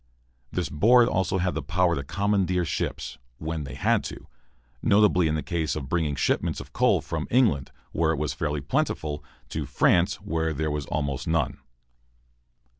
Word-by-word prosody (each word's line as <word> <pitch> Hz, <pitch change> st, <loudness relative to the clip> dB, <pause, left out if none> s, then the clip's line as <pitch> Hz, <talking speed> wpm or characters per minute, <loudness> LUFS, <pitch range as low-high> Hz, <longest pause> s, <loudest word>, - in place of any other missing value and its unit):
This 90 Hz, -, -1 dB
board 115 Hz, +10 st, +5 dB
also 95 Hz, 0 st, 0 dB
had 90 Hz, 0 st, -1 dB
power 90 Hz, 0 st, +2 dB
to 70 Hz, -, -2 dB
commandeer 90 Hz, +2 st, +1 dB
ships, 65 Hz, -3 st, -3 dB, 0.2 s
when 80 Hz, 0 st, -4 dB
they 65 Hz, -, -7 dB
had -, -, +2 dB
to -, -, -7 dB, 0.6 s
notably 100 Hz, -4 st, +4 dB
in 75 Hz, -, 0 dB
the 75 Hz, -, -2 dB
case 80 Hz, -3 st, -1 dB
of 70 Hz, -4 st, -5 dB
bringing 80 Hz, -4 st, 0 dB
shipments -, -, 0 dB
of -, -, -10 dB
coal -, -, +3 dB
from -, -, -4 dB
England, 110 Hz, -, +3 dB, 0.2 s
where 80 Hz, 0 st, +1 dB
it 80 Hz, -, -1 dB
was 75 Hz, -1 st, -1 dB
fairly 75 Hz, -2 st, -2 dB
plentiful, 75 Hz, +2 st, -1 dB, 0.3 s
to -, -, -3 dB
France, -, -, +3 dB
where 80 Hz, -1 st, -2 dB
there 80 Hz, +2 st, -1 dB
was 75 Hz, -1 st, -3 dB
almost 70 Hz, -3 st, -2 dB
none. 80 Hz, -5 st, 0 dB
80 Hz, 165 wpm, -26 LUFS, 75-90 Hz, 0.6 s, board